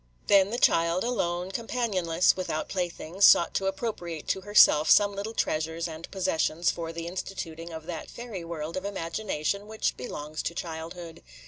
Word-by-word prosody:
Then 195 Hz, -1 st, +5 dB
the 235 Hz, -, -2 dB
child, 170 Hz, -5 st, +3 dB
alone, 180 Hz, -6 st, -1 dB
companionless, 195 Hz, -7 st, +1 dB
without 180 Hz, -4 st, -3 dB
playthings, 180 Hz, 0 st, -3 dB
sought 170 Hz, -, +7 dB
to 195 Hz, -, 0 dB
appropriate 190 Hz, -6 st, -4 dB
to 190 Hz, -, 0 dB
herself 185 Hz, -6 st, +6 dB
some 205 Hz, -1 st, +6 dB
little 205 Hz, +3 st, -5 dB
treasures 160 Hz, +2 st, -1 dB
and 160 Hz, 0 st, -8 dB
possessions 175 Hz, -3 st, 0 dB
for 165 Hz, -1 st, -5 dB
the 165 Hz, 0 st, -6 dB
instituting 170 Hz, -2 st, -6 dB
of 160 Hz, -1 st, -8 dB
that 165 Hz, -2 st, -6 dB
fairy 230 Hz, -7 st, -7 dB
world 165 Hz, -1 st, -5 dB
of 185 Hz, -, -3 dB
imagination 200 Hz, 0 st, -3 dB
which 220 Hz, 0 st, -1 dB
belongs 150 Hz, +4 st, -5 dB
to 170 Hz, -, -4 dB
childhood. 165 Hz, 0 st, -7 dB
175 Hz, 155 wpm, -27 LUFS, 165-195 Hz, -, sought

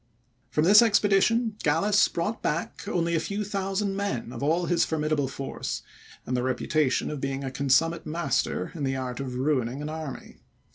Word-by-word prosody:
From 150 Hz, -, +1 dB
this 205 Hz, +6 st, +8 dB
expedition, 215 Hz, +1 st, +3 dB
Gallas 195 Hz, +8 st, +3 dB
brought 175 Hz, +7 st, -3 dB
back 165 Hz, +5 st, -3 dB
only 170 Hz, -4 st, 0 dB
a 165 Hz, -, +2 dB
few 205 Hz, +4 st, -3 dB
thousand 195 Hz, 0 st, -2 dB
men 160 Hz, -, -3 dB
of 115 Hz, -, -7 dB
all 165 Hz, +5 st, +1 dB
his 170 Hz, -1 st, +2 dB
formidable 155 Hz, -3 st, 0 dB
force, 135 Hz, +1 st, -5 dB, 0.4 s
and 125 Hz, -, -2 dB
the 125 Hz, -, +1 dB
reputation 130 Hz, +3 st, 0 dB
of 150 Hz, -3 st, -5 dB
being 135 Hz, 0 st, -2 dB
a 135 Hz, -, -4 dB
consummate 160 Hz, +5 st, +1 dB
master 170 Hz, +2 st, -1 dB
in 160 Hz, -5 st, -5 dB
the 135 Hz, -1 st, 0 dB
art 130 Hz, -1 st, -4 dB
of 130 Hz, -2 st, -4 dB
ruining 130 Hz, -1 st, 0 dB
an 150 Hz, +1 st, -4 dB
army. 155 Hz, -4 st, -7 dB
155 Hz, 175 wpm, -27 LUFS, 135-195 Hz, 0.4 s, this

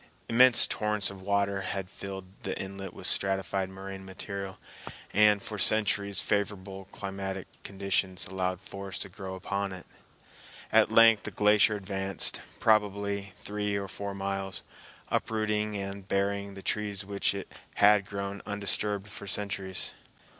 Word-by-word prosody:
Immense 120 Hz, 0 st, +7 dB
torrents 105 Hz, -2 st, 0 dB
of 95 Hz, -1 st, -10 dB
water 100 Hz, 0 st, +1 dB
had 95 Hz, 0 st, -3 dB
filled 95 Hz, 0 st, -7 dB
in 95 Hz, +1 st, -20 dB
the -, -, -3 dB
inlet 95 Hz, -1 st, -5 dB
with -, -, -9 dB
stratified 95 Hz, 0 st, +1 dB
moraine 95 Hz, 0 st, -7 dB
material, 95 Hz, 0 st, -6 dB, 0.6 s
and 105 Hz, 0 st, +5 dB
for 105 Hz, -2 st, -5 dB
centuries 100 Hz, -2 st, +3 dB
favorable 100 Hz, -1 st, -1 dB
climatic 95 Hz, -1 st, -5 dB, 0.2 s
conditions 95 Hz, -2 st, -1 dB
allowed 95 Hz, -1 st, -2 dB
forests 100 Hz, 0 st, -5 dB
to -, -, -9 dB
grow 95 Hz, +1 st, -6 dB
upon 100 Hz, +1 st, -2 dB
it. 95 Hz, -2 st, -8 dB, 0.9 s
At -, -, +5 dB
length 115 Hz, -2 st, +7 dB
the -, -, -4 dB
glacier 105 Hz, 0 st, +4 dB
advanced, 95 Hz, -1 st, -1 dB, 0.2 s
probably 100 Hz, -2 st, +2 dB
three 105 Hz, 0 st, -1 dB
or 100 Hz, -1 st, -2 dB
four 100 Hz, +1 st, -5 dB
miles, 95 Hz, -1 st, -3 dB, 0.5 s
uprooting 105 Hz, -1 st, 0 dB
and 100 Hz, 0 st, -5 dB
burying 100 Hz, 0 st, 0 dB
the 95 Hz, -, -9 dB
trees 105 Hz, -2 st, -2 dB
which 100 Hz, 0 st, +1 dB, 0.4 s
had 105 Hz, -2 st, +6 dB
grown 100 Hz, 0 st, -4 dB
undisturbed 105 Hz, 0 st, -1 dB
for 100 Hz, -1 st, -8 dB
centuries. 95 Hz, -2 st, -2 dB
100 Hz, 135 wpm, -30 LUFS, 95-105 Hz, 0.9 s, Immense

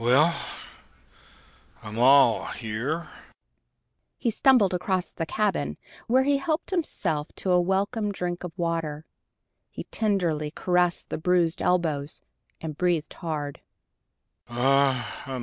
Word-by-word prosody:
"Well, 140 Hz, +8 st, +4 dB, 1.5 s
I'm 110 Hz, +1 st, -6 dB
all 130 Hz, -2 st, +6 dB
here!" 125 Hz, +9 st, -3 dB, 1.1 s
He 235 Hz, -, 0 dB
stumbled 225 Hz, -5 st, +4 dB
across 180 Hz, 0 st, -1 dB
the 165 Hz, -, -4 dB
cabin, 165 Hz, -, -1 dB, 0.3 s
where 255 Hz, +3 st, +4 dB
he 285 Hz, +1 st, +3 dB
helped 310 Hz, +6 st, -2 dB
himself 175 Hz, -, -1 dB
to 190 Hz, -, -2 dB
a 180 Hz, 0 st, +5 dB
welcome 200 Hz, +4 st, 0 dB
drink 180 Hz, -2 st, -4 dB
of 180 Hz, -, -5 dB
water. 165 Hz, -3 st, -2 dB, 0.6 s
He -, -, -7 dB
tenderly 175 Hz, -8 st, 0 dB
caressed 180 Hz, +2 st, 0 dB
the -, -, -2 dB
bruised 175 Hz, 0 st, +2 dB
elbows, 160 Hz, -5 st, 0 dB, 0.4 s
and 155 Hz, -2 st, -5 dB
breathed 175 Hz, -2 st, 0 dB
hard. 150 Hz, -5 st, -4 dB
170 Hz, 110 wpm, -26 LUFS, 150-195 Hz, 1.5 s, all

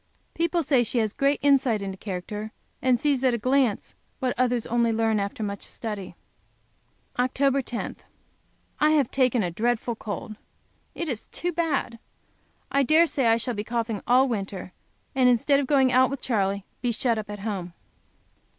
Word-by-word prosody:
People 335 Hz, 0 st, 0 dB
say 270 Hz, -3 st, +3 dB
she 240 Hz, +1 st, -1 dB
has 220 Hz, -2 st, +1 dB
great 280 Hz, +1 st, +2 dB
insight 270 Hz, -6 st, +4 dB
into 195 Hz, -1 st, -5 dB
character, 205 Hz, +3 st, -5 dB, 0.3 s
and 255 Hz, -2 st, +3 dB
sees, 285 Hz, -3 st, +1 dB
at 255 Hz, -2 st, +3 dB
a -, -, -1 dB
glance, 255 Hz, -1 st, +1 dB, 0.2 s
what 255 Hz, -3 st, -1 dB
others 245 Hz, -1 st, +1 dB
only 235 Hz, 0 st, +1 dB
learn 220 Hz, -1 st, +1 dB
after 200 Hz, +2 st, -3 dB
much 200 Hz, -1 st, -4 dB
study. 205 Hz, -6 st, -6 dB, 1.0 s
Oct. 270 Hz, +2 st, +2 dB
10. 240 Hz, -, -5 dB, 0.8 s
I 305 Hz, -, +4 dB
have 295 Hz, -5 st, +2 dB
taken 250 Hz, -4 st, +2 dB
a 175 Hz, -, -2 dB
dreadful 235 Hz, +4 st, -1 dB
cold. 215 Hz, 0 st, -6 dB, 0.6 s
It 335 Hz, -, -3 dB
is 245 Hz, -7 st, -4 dB
too 350 Hz, -, -3 dB
bad. 310 Hz, -8 st, -1 dB, 0.7 s
I 280 Hz, -, +3 dB
dare 310 Hz, +5 st, +5 dB
say 275 Hz, -6 st, 0 dB
I 225 Hz, 0 st, +5 dB
shall 240 Hz, +2 st, -2 dB
be 210 Hz, -1 st, -3 dB
coughing 230 Hz, -2 st, -2 dB
all 255 Hz, +2 st, +5 dB
winter, 195 Hz, -5 st, -4 dB, 0.4 s
and 255 Hz, -1 st, +4 dB
instead 260 Hz, +4 st, +3 dB
of 280 Hz, -, -1 dB
going 270 Hz, -3 st, +4 dB
out 255 Hz, +1 st, +5 dB
with 275 Hz, 0 st, -4 dB
Charley, 200 Hz, -5 st, -1 dB, 0.2 s
be 245 Hz, -, 0 dB
shut 230 Hz, 0 st, 0 dB
up 210 Hz, -, -7 dB
at 205 Hz, -1 st, -6 dB
home. 190 Hz, -5 st, -4 dB
240 Hz, 170 wpm, -25 LUFS, 215-270 Hz, 1.0 s, dare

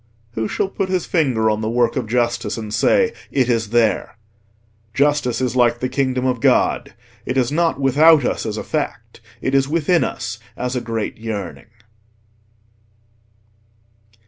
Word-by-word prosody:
Who 110 Hz, -1 st, -2 dB
shall -, -, -1 dB
put 195 Hz, -1 st, -3 dB
his 185 Hz, -2 st, 0 dB
finger 130 Hz, -10 st, +1 dB
on 110 Hz, 0 st, +1 dB
the 110 Hz, -, -2 dB
work 120 Hz, 0 st, +1 dB
of -, -, -2 dB
justice, 120 Hz, -2 st, -1 dB
and 110 Hz, -2 st, -6 dB
say, 230 Hz, -, +3 dB, 0.2 s
"It 130 Hz, -3 st, +1 dB
is 110 Hz, -2 st, 0 dB
there"? 115 Hz, -2 st, +1 dB, 0.8 s
Justice 140 Hz, -4 st, +1 dB
is 125 Hz, -1 st, -1 dB
like 120 Hz, -1 st, +3 dB
the 130 Hz, -, -2 dB
Kingdom 130 Hz, -1 st, -1 dB
of 125 Hz, -2 st, 0 dB
God—it 130 Hz, -, -1 dB
is 125 Hz, -1 st, +1 dB
not 165 Hz, -1 st, +1 dB
without 145 Hz, +2 st, +5 dB
us -, -, -2 dB
as 110 Hz, 0 st, -3 dB
a -, -, -4 dB
fact, -, -, -4 dB, 0.2 s
it 130 Hz, -, -1 dB
is 135 Hz, 0 st, +3 dB
within 170 Hz, +2 st, +2 dB
us -, -, -4 dB, 0.2 s
as 125 Hz, +1 st, -3 dB
a 125 Hz, -, -1 dB
great 115 Hz, -2 st, -4 dB
yearning. 105 Hz, -6 st, -6 dB
125 Hz, 155 wpm, -20 LUFS, 115-145 Hz, 0.8 s, without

